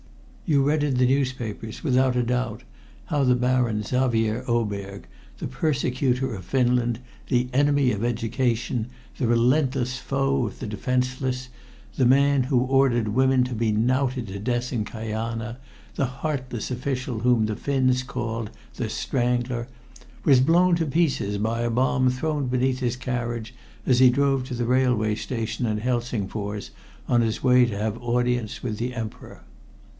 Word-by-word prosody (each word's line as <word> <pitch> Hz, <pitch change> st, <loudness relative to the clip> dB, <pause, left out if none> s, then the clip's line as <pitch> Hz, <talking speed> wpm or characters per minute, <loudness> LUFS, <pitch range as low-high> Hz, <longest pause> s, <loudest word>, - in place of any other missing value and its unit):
You 140 Hz, -3 st, +3 dB
read 145 Hz, +2 st, +2 dB
in 145 Hz, -3 st, +1 dB
the 125 Hz, 0 st, +3 dB
newspapers, 125 Hz, -5 st, -2 dB
without 130 Hz, -3 st, +2 dB
a 125 Hz, -, +2 dB
doubt, 125 Hz, -2 st, -2 dB, 0.4 s
how 145 Hz, -2 st, 0 dB
the 125 Hz, -1 st, +4 dB
Baron 125 Hz, -3 st, +1 dB
Xavier 120 Hz, -1 st, 0 dB
Oberg, 100 Hz, -4 st, -2 dB, 0.3 s
the -, -, -4 dB
persecutor 130 Hz, -2 st, 0 dB
of 95 Hz, -3 st, -7 dB
Finland, 120 Hz, +2 st, +1 dB, 0.3 s
the 125 Hz, -1 st, +2 dB
enemy 145 Hz, -1 st, +3 dB
of 105 Hz, +2 st, -3 dB
education, 120 Hz, 0 st, -1 dB, 0.3 s
the 125 Hz, -, 0 dB
relentless 125 Hz, +1 st, +2 dB
foe 135 Hz, -1 st, 0 dB
of 105 Hz, -, -9 dB
the -, -, -5 dB
defenseless, 125 Hz, +3 st, -2 dB, 0.5 s
the 130 Hz, -, +2 dB
man 140 Hz, +1 st, +4 dB
who 130 Hz, -2 st, +2 dB
ordered 130 Hz, -4 st, +2 dB
women 130 Hz, +3 st, +3 dB
to 125 Hz, -, -4 dB
be 115 Hz, -1 st, 0 dB
knouted 125 Hz, +2 st, +1 dB
to 100 Hz, +1 st, -5 dB
death 120 Hz, +3 st, -2 dB
in 115 Hz, -3 st, 0 dB
Kajana, 115 Hz, +1 st, -4 dB, 0.4 s
the 135 Hz, -, +1 dB
heartless 130 Hz, -3 st, -4 dB
official 125 Hz, -2 st, -3 dB
whom 120 Hz, -1 st, +3 dB
the 110 Hz, 0 st, -2 dB
Finns 130 Hz, 0 st, +1 dB
called 115 Hz, -3 st, -4 dB, 0.3 s
"The -, -, -3 dB
Strangler," 120 Hz, -1 st, -1 dB, 0.6 s
was 135 Hz, -3 st, +6 dB
blown 170 Hz, +5 st, +4 dB
to 165 Hz, -, 0 dB
pieces 140 Hz, -10 st, +1 dB
by 110 Hz, +3 st, -1 dB
a 120 Hz, -, 0 dB
bomb 130 Hz, +2 st, +2 dB
thrown 145 Hz, +2 st, -1 dB
beneath 130 Hz, +1 st, +1 dB
his 125 Hz, -1 st, -1 dB
carriage 120 Hz, -2 st, -3 dB, 0.3 s
as 125 Hz, -2 st, +3 dB
he 130 Hz, -1 st, +8 dB
drove 135 Hz, 0 st, +1 dB
to 130 Hz, -1 st, -5 dB
the 120 Hz, 0 st, -1 dB
railway 125 Hz, -4 st, +2 dB
station 115 Hz, +1 st, -3 dB
at 105 Hz, -1 st, -1 dB
Helsingfors 110 Hz, -4 st, -3 dB, 0.4 s
on 120 Hz, -, +3 dB
his 115 Hz, -1 st, -1 dB
way 125 Hz, -1 st, +6 dB
to 105 Hz, -4 st, -4 dB
have 110 Hz, +2 st, -2 dB
audience 120 Hz, -2 st, -1 dB
with 110 Hz, -4 st, -3 dB
the 125 Hz, +1 st, -3 dB
Emperor. 110 Hz, -3 st, -7 dB
125 Hz, 155 wpm, -24 LUFS, 115-130 Hz, 0.6 s, he